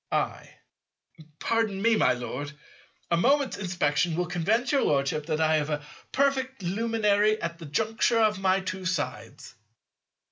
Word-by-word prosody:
I. - - -2 0.9
Pardon 225 -2 0
me, 230 +2 +3
my 130 -11 +3
Lord, 130 +4 -5 0.6
a 170 - +3
moment's 275 +8 +2
inspection 175 -3 0
will 180 +1 0
convince 210 +9 0
your 280 - +3
Lordship 145 +2 0
that 155 -1 -1
I 160 0 +3
have 150 0 -2
a 150 -1 -3 0.3
perfectly 265 -7 0
luminary 215 0 +2
at 170 -2 -4
the 165 - -9
juncture 225 +8 +1
of 215 -3 +2
my 190 0 +2
two 185 0 -5
sides. 185 -6 -4
190 Hz, 145 wpm, -27 LUFS, 155-225 Hz, 0.9 s, me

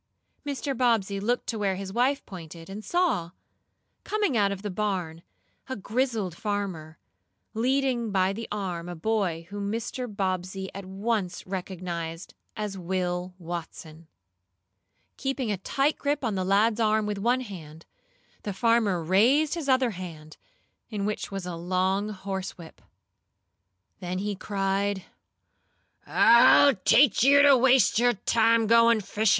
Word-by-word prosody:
Mr. 280 -1 -3
Bobbsey 225 -5 +1
looked 240 +5 -1
to 225 - -3
where 195 -2 0
his 190 0 -6
wife 260 +5 +1
pointed, 170 -2 -10
and 210 +2 -7
saw, 345 - 0 0.7
coming 415 - 0
out 200 -3 +3
of 200 0 -6
the 205 - -3
barn, 180 -5 -3 0.5
a 260 - -3
grizzled 220 -3 -2
farmer, 185 -7 -4 0.6
leading 250 0 0
by 190 0 +2
the 225 +3 -6
arm 180 -4 -4
a 175 - -6
boy 175 -3 -1
whom 200 0 -3
Mr. 235 +3 -4
Bobbsey 190 -2 -3
at 195 0 -7
once 195 -1 -2
recognized 180 -3 -5 0.2
as 210 -2 -4
Will 180 0 -3
Watson. 165 -2 -8 1.1
Keeping 270 -4 -2
a 200 - -1
tight 275 - 0
grip 290 0 -1
on 225 -4 0
the 190 -1 -1
lad's 210 +4 +2
arm 215 -1 +2
with 210 -1 -3
one 245 +5 +1
hand, 165 -8 -10 0.6
the 205 - -4
farmer 215 -4 +2
raised 245 - +3
his 325 -5 -4
other 260 -2 +3
hand, 165 -5 -9 0.5
in 205 -3 -3
which 210 0 -3
was 195 -2 -5
a 180 -1 -5
long 185 +4 0
horsewhip. 190 -4 -7 1.2
Then 180 -1 -4
he 205 +2 -2
cried: 195 0 -1 1.0
"I'll 235 +4 +6
teach 230 +4 +4
you 280 +2 +6
to 285 -1 +7
waste 255 -2 +4
your 245 0 +4
time 225 +2 +2
goin' 230 0 +5
fishin'! 210 +2 0
200 Hz, 140 wpm, -26 LUFS, 185-235 Hz, 1.2 s, to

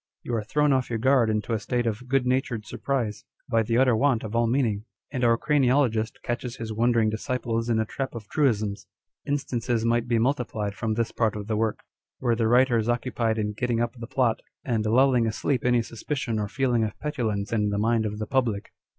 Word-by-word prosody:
You 120 - -4
are 110 -2 0
thrown 150 +6 +2
off 130 -1 0
your 115 - -1
guard 125 0 +3
into 110 +1 -1
a 110 - 0
state 120 +2 -1
of 115 +2 -3
good 135 0 +2
natured 125 -4 0
surprise, 115 -1 -2 0.2
by 115 -3 +2
the 115 +1 0
utter 130 -2 +4
want 120 -1 +2
of 110 +1 -5
all 115 0 +3
meaning; 115 -4 0 0.3
and 125 - -2
our 115 -1 +4
craniologist 130 -6 +1
catches 120 0 -3
his 110 -1 -5
wondering 115 -1 +2
disciples 115 0 -2
in 115 - +2
a 110 - +1
trap 130 +3 -4
of 110 -3 -7
truisms. 110 -9 0 0.4
Instances 120 -5 -1
might 120 0 +1
be 120 -1 +2
multiplied 115 -4 -1
from 110 +1 -2
this 115 0 -1
part 110 -3 0
of 105 -1 -5
the 110 +1 -1
work, 110 0 -1 0.4
where 120 -2 +1
the 115 -1 +1
writer 125 0 +4
is 110 +1 -1
occupied 120 -2 0
in 105 -1 -1
getting 120 +2 -1
up 120 0 0
the 115 -1 -8
plot, 125 -3 +1 0.2
and 110 -4 0
lulling 125 0 +4
asleep 120 +3 -1
any 120 -1 +3
suspicion 115 0 -3
or 105 - -1
feeling 125 0 +1
of 105 -2 -3
petulance 115 -9 -2
in 105 -2 +1
the 100 - -1
mind 110 +1 +2
of 105 0 -5
the 110 - -3
public. 115 -4 -1
115 Hz, 210 wpm, -26 LUFS, 110-125 Hz, 0.4 s, utter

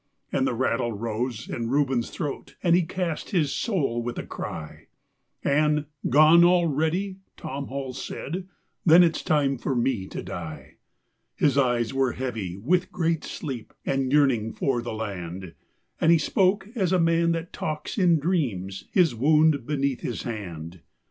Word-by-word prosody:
And 135 -1 +1
the 120 - -1
rattle 120 -1 0
rose 115 +2 -3
in 115 -1 -3
Reuben's 135 -3 +1
throat 145 -2 -5
and 170 -2 +5
he 180 - +4
cast 170 -1 -3
his 160 -9 +1
soul 140 - 0
with 120 +1 -4
a - - -4
cry, 75 -2 -7 0.6
And 150 +1 +2 0.2
"Gone 155 +5 +7
already?" 175 +2 +2 0.2
Tom 140 0 -5
Hall 135 -1 -5
he - - -7
said. 180 +5 -5 0.4
"Then 170 +1 +8
it's 165 -2 +1
time 140 -4 +1
for 135 - -2
me 120 -5 0
to - - -6
die." 80 -7 -8 0.6
His 145 - +2
eyes 120 -3 +2
were 135 -2 +1
heavy 110 -9 -4
with 175 - +1
great 165 -2 0
sleep 130 -7 -6
and 135 -1 0
yearning 130 -7 +3
for 130 -4 0
the 120 - -5
land, 95 -5 -5 0.5
And 160 - +4
he 170 - +7
spoke 190 +5 +1
as 190 -8 0
a 185 - +3
man 165 0 +3
that 165 +1 -5
talks 155 +7 -4
in 175 -3 +5
dreams, 120 - -2
his 175 -7 +4
wound 150 +2 +3
beneath 140 -3 -1
his 120 - -4
hand. 85 -7 -6
140 Hz, 160 wpm, -25 LUFS, 115-165 Hz, 0.6 s, Then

